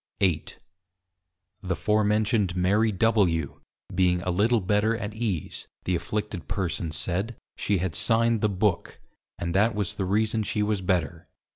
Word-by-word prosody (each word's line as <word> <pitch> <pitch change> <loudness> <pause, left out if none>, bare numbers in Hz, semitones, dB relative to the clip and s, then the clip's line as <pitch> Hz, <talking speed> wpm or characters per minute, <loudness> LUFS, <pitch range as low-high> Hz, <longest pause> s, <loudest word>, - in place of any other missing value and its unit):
_ - - +6
8. 80 -5 -2 1.0
The 95 -2 -2
forementioned 105 +1 +1
Mary 100 +5 +2
W. 95 -8 +1 0.3
being 90 -1 +2
a 90 - -1
little 110 +6 +3
better 105 +3 +1
at 105 -1 -5
ease, 105 -8 -3 0.2
the 90 - -1
Afflicted 105 +1 -4
persons 85 -4 -2
said, 95 +6 -1 0.2
she 100 - 0
had 90 -3 -2
signed 115 +2 +3
the 105 - +2
Book; 95 -2 -1 0.4
and 85 0 -3
that 105 +3 +3
was 100 -4 -1
the 95 - -3
reason 110 +3 +1
she 105 0 -1
was 105 -2 0
better. 90 -5 -1
100 Hz, 150 wpm, -26 LUFS, 90-110 Hz, 1.0 s, _